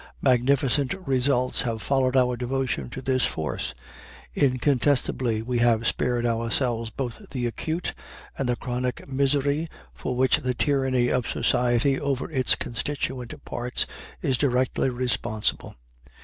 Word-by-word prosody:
Magnificent 135 +3 +3
results 130 -1 +2
have 115 -3 -2
followed 130 +1 +1
our 125 -1 +3
devotion 125 +1 -2
to 130 +2 -7
this 130 -1 +1
force; 80 -1 -2 0.6
incontestably, 130 -3 +1
we 120 +1 -1
have 115 -1 +3
spared 120 0 0
ourselves 115 0 0
both 120 +1 -5
the 125 -3 -2
acute 160 +9 -2 0.4
and 135 -2 -2
the 120 - +2
chronic 125 0 -3
misery 140 +3 +1 0.2
for 125 - -4
which 130 +2 +4
the 130 -4 -2
tyranny 130 -3 +2
of 125 -1 0
society 125 +3 +2
over 140 0 -2
its 130 -4 +4
constituent 125 0 -4
parts 120 +1 -2 0.4
is 130 -2 +1
directly 130 -1 +1
responsible. 120 -4 -1
125 Hz, 125 wpm, -25 LUFS, 120-135 Hz, 0.6 s, which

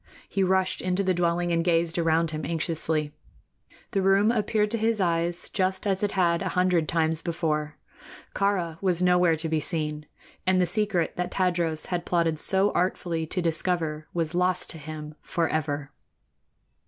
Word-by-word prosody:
He 195 - 0
rushed 190 0 +1
into 185 +2 0
the 185 -1 +2
dwelling 175 0 0
and 165 0 +1
gazed 170 -1 +1
around 165 0 +2
him 155 -1 -4
anxiously. 160 -2 -1 0.8
The 195 - +1
room 195 +3 +4
appeared 215 -2 0
to 230 - -1
his 225 0 +1
eyes 170 -1 0
just 190 0 -1
as 195 -2 0
it 205 -1 0
had 170 -3 +2
a 190 - -1
hundred 180 -3 +2
times 160 -1 +1
before. 155 -3 -2 0.6
Kāra 180 -5 0
was 180 -2 +1
nowhere 180 -2 +4
to 160 +1 -3
be 160 0 0
seen, 150 -2 -3 0.4
and 185 0 +4
the 180 - +4
secret 185 -2 0
that 180 0 -1
Tadros 170 -4 0
had 175 -1 -1
plotted 165 -3 0
so 195 +4 +3
artfully 170 -2 -1
to 180 +2 -2
discover 160 -2 -1
was 165 -1 -2
lost 180 +1 +2
to 160 - -9
him 155 0 -8
forever. 155 -4 -2
170 Hz, 165 wpm, -26 LUFS, 160-185 Hz, 0.8 s, room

